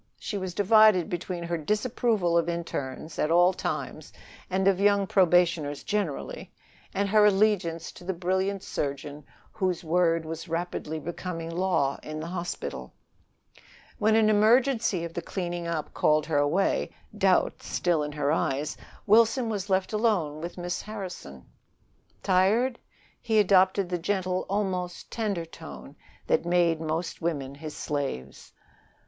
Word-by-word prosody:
She 210 Hz, -, -5 dB
was 185 Hz, -2 st, -5 dB
divided 215 Hz, -3 st, +5 dB
between 175 Hz, 0 st, -4 dB
her 170 Hz, 0 st, -2 dB
disapproval 210 Hz, -, 0 dB
of 170 Hz, 0 st, +2 dB
internes 160 Hz, -3 st, -5 dB
at 150 Hz, -, +1 dB
all 175 Hz, +2 st, +5 dB
times -, -, -4 dB, 0.4 s
and 190 Hz, +1 st, +1 dB
of 195 Hz, -1 st, +3 dB
young 200 Hz, 0 st, +3 dB
probationers 175 Hz, -6 st, +2 dB
generally, 200 Hz, -9 st, -3 dB, 0.4 s
and 200 Hz, +1 st, 0 dB
her 210 Hz, +1 st, +5 dB
allegiance 195 Hz, -5 st, +2 dB
to -, -, -14 dB
the 185 Hz, -, -2 dB
brilliant 190 Hz, +2 st, -1 dB
surgeon 145 Hz, +1 st, -4 dB, 0.3 s
whose 185 Hz, -5 st, -1 dB
word 165 Hz, 0 st, +2 dB
was 165 Hz, +2 st, -6 dB
rapidly 165 Hz, -2 st, -3 dB
becoming 165 Hz, 0 st, -5 dB
law 170 Hz, -6 st, 0 dB
in 155 Hz, 0 st, -6 dB
the 155 Hz, -, -5 dB
hospital. 170 Hz, -, -5 dB, 1.1 s
When 215 Hz, +1 st, +3 dB
an 220 Hz, -1 st, +4 dB
emergency 220 Hz, -2 st, +3 dB
of 165 Hz, -, -8 dB
the 170 Hz, -, -3 dB
cleaning 175 Hz, -1 st, -4 dB
up 165 Hz, -3 st, -3 dB
called 155 Hz, 0 st, +2 dB
her 155 Hz, -3 st, +1 dB
away, 155 Hz, +7 st, +1 dB, 0.3 s
doubt -, -, +2 dB
still 175 Hz, -3 st, 0 dB
in 150 Hz, 0 st, -4 dB
her 145 Hz, -1 st, 0 dB
eyes, 150 Hz, -1 st, -1 dB, 0.3 s
Wilson 230 Hz, +3 st, +4 dB
was 205 Hz, -2 st, -3 dB
left 190 Hz, +2 st, +1 dB
alone 190 Hz, -9 st, 0 dB
with 170 Hz, +2 st, -6 dB
Miss 175 Hz, +1 st, -3 dB
Harrison. 185 Hz, -, -8 dB, 0.8 s
"Tired?" 210 Hz, +7 st, +2 dB, 0.4 s
He 220 Hz, -2 st, +1 dB
adopted 190 Hz, -1 st, +4 dB
the 180 Hz, -1 st, -1 dB
gentle, 185 Hz, 0 st, -1 dB
almost 185 Hz, -3 st, -2 dB
tender 205 Hz, -7 st, -2 dB
tone 70 Hz, -, -11 dB, 0.3 s
that -, -, +2 dB
made 170 Hz, -2 st, +2 dB
most 165 Hz, +2 st, -3 dB
women 145 Hz, -5 st, -2 dB
his 150 Hz, +2 st, -8 dB
slaves. 135 Hz, -, -4 dB
175 Hz, 140 wpm, -27 LUFS, 160-200 Hz, 1.1 s, divided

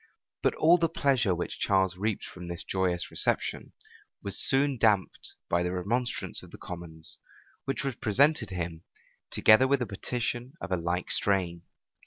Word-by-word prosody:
But -, -, +2 dB
all 170 Hz, +3 st, +5 dB
the 165 Hz, -1 st, +2 dB
pleasure 130 Hz, -, +2 dB
which 85 Hz, -, -4 dB
Charles 95 Hz, -2 st, +2 dB
reaped 105 Hz, +2 st, -2 dB
from 90 Hz, -1 st, -9 dB
this 85 Hz, -1 st, -5 dB
joyous 90 Hz, -2 st, -1 dB
reception, -, -, 0 dB, 0.5 s
was 100 Hz, -, -2 dB
soon 135 Hz, -1 st, +2 dB
damped 105 Hz, -4 st, +1 dB
by 85 Hz, -, +1 dB
the 90 Hz, 0 st, -1 dB
remonstrance 115 Hz, +7 st, -2 dB
of -, -, -13 dB
the -, -, -11 dB
commons, 85 Hz, -2 st, -5 dB, 0.5 s
which 135 Hz, -, -2 dB
was 135 Hz, -1 st, -1 dB
presented 125 Hz, +2 st, +3 dB
him, 85 Hz, -3 st, -4 dB, 0.5 s
together 110 Hz, +5 st, +5 dB
with 140 Hz, 0 st, +3 dB
a 125 Hz, -, -1 dB
petition 120 Hz, +4 st, -3 dB
of -, -, -7 dB
a -, -, +3 dB
like 85 Hz, +1 st, -2 dB
strain. 90 Hz, -4 st, +1 dB
100 Hz, 160 wpm, -29 LUFS, 90-125 Hz, 0.5 s, all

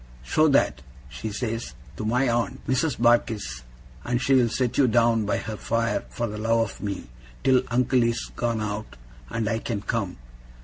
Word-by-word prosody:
"Show 155 Hz, -, +3 dB
that," 70 Hz, -, +3 dB, 0.3 s
she 110 Hz, -, -5 dB
says, 115 Hz, +1 st, -3 dB, 0.2 s
"to -, -, -5 dB
my 125 Hz, +5 st, +2 dB
aunt, 120 Hz, 0 st, -1 dB
Mrs. 135 Hz, +4 st, +1 dB
Barkis, 110 Hz, -, +2 dB, 0.4 s
and 120 Hz, 0 st, 0 dB
she'll 130 Hz, -2 st, +4 dB
set 125 Hz, +2 st, 0 dB
you 135 Hz, -, +6 dB
down 115 Hz, -2 st, +3 dB
by -, -, +1 dB
her 110 Hz, 0 st, -5 dB
fire, 115 Hz, +2 st, 0 dB
for 120 Hz, -, -2 dB
the 105 Hz, -2 st, -5 dB
love 115 Hz, +1 st, +2 dB
of -, -, -14 dB
me, 100 Hz, -2 st, -4 dB, 0.4 s
till 130 Hz, -1 st, +5 dB
uncle 125 Hz, +1 st, +3 dB
is 115 Hz, 0 st, 0 dB
gone 115 Hz, -2 st, -1 dB
out, 105 Hz, +1 st, -4 dB, 0.3 s
and 115 Hz, -2 st, -2 dB
I 115 Hz, 0 st, 0 dB
can 115 Hz, -3 st, -3 dB
come." 100 Hz, -4 st, -2 dB
115 Hz, 175 wpm, -25 LUFS, 110-125 Hz, 0.4 s, you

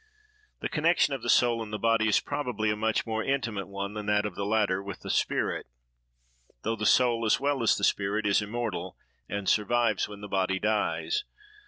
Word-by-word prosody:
The -, -, -1 dB
connection 160 Hz, -1 st, +2 dB
of 135 Hz, -, -3 dB
the 120 Hz, -, -4 dB
soul 120 Hz, -2 st, +4 dB
and 110 Hz, -1 st, -6 dB
the 105 Hz, -, -2 dB
body 115 Hz, 0 st, +2 dB
is 105 Hz, -, +4 dB
probably 125 Hz, -7 st, -2 dB
a -, -, 0 dB
much 110 Hz, +1 st, 0 dB
more 110 Hz, -1 st, -2 dB
intimate 120 Hz, -8 st, -2 dB
one 100 Hz, 0 st, -5 dB
than 105 Hz, -1 st, -6 dB
that 105 Hz, 0 st, +2 dB
of 105 Hz, -, -3 dB
the 100 Hz, +2 st, -3 dB
latter 105 Hz, -3 st, +1 dB
with 100 Hz, 0 st, -8 dB
the -, -, -4 dB
spirit,—though -, -, -4 dB
the 105 Hz, -1 st, -1 dB
soul, 120 Hz, -2 st, +4 dB
as 110 Hz, -, +3 dB
well 140 Hz, -1 st, 0 dB
as 115 Hz, -, +4 dB
the 100 Hz, -, -5 dB
spirit, 100 Hz, +2 st, +1 dB
is 100 Hz, +1 st, +3 dB
immortal, 105 Hz, -5 st, -4 dB, 0.3 s
and 100 Hz, 0 st, -4 dB
survives 110 Hz, 0 st, +2 dB
when 105 Hz, -1 st, -10 dB
the 105 Hz, -, -6 dB
body 95 Hz, -1 st, 0 dB
dies. 90 Hz, -6 st, 0 dB
105 Hz, 195 wpm, -28 LUFS, 100-115 Hz, 0.3 s, soul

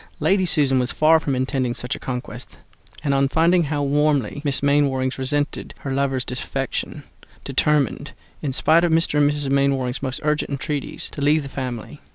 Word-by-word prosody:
Lady 190 Hz, -1 st, +2 dB
Susan 135 Hz, -5 st, +3 dB
was 125 Hz, 0 st, -1 dB
far 160 Hz, +1 st, +4 dB
from 145 Hz, -4 st, -2 dB
intending 130 Hz, -1 st, -1 dB
such 125 Hz, -, -3 dB
a -, -, -9 dB
conquest, 125 Hz, -1 st, -6 dB, 0.5 s
and 140 Hz, -3 st, +1 dB
on 135 Hz, 0 st, +3 dB
finding 170 Hz, +3 st, +3 dB
how 145 Hz, 0 st, -1 dB
warmly 145 Hz, -2 st, +1 dB
Miss 140 Hz, -2 st, -1 dB
Mainwaring 140 Hz, -2 st, +2 dB
resented 145 Hz, +3 st, -2 dB
her 135 Hz, -, -5 dB
lover's 135 Hz, -2 st, 0 dB
defection, 135 Hz, +1 st, -4 dB, 0.4 s
determined, 150 Hz, -5 st, 0 dB, 0.3 s
in 140 Hz, -, -2 dB
spite 160 Hz, +5 st, +3 dB
of 175 Hz, -, +2 dB
Mr. 160 Hz, -2 st, +2 dB
and 145 Hz, 0 st, +4 dB
Mrs. 145 Hz, -2 st, -2 dB
Mainwaring's 135 Hz, -2 st, +1 dB
most 130 Hz, -1 st, -3 dB
urgent 150 Hz, 0 st, 0 dB
entreaties, 140 Hz, +1 st, -4 dB
to 145 Hz, -, -7 dB
leave 150 Hz, +2 st, +3 dB
the 140 Hz, -, -7 dB
family. 130 Hz, +2 st, -6 dB
140 Hz, 175 wpm, -22 LUFS, 130-150 Hz, 0.5 s, far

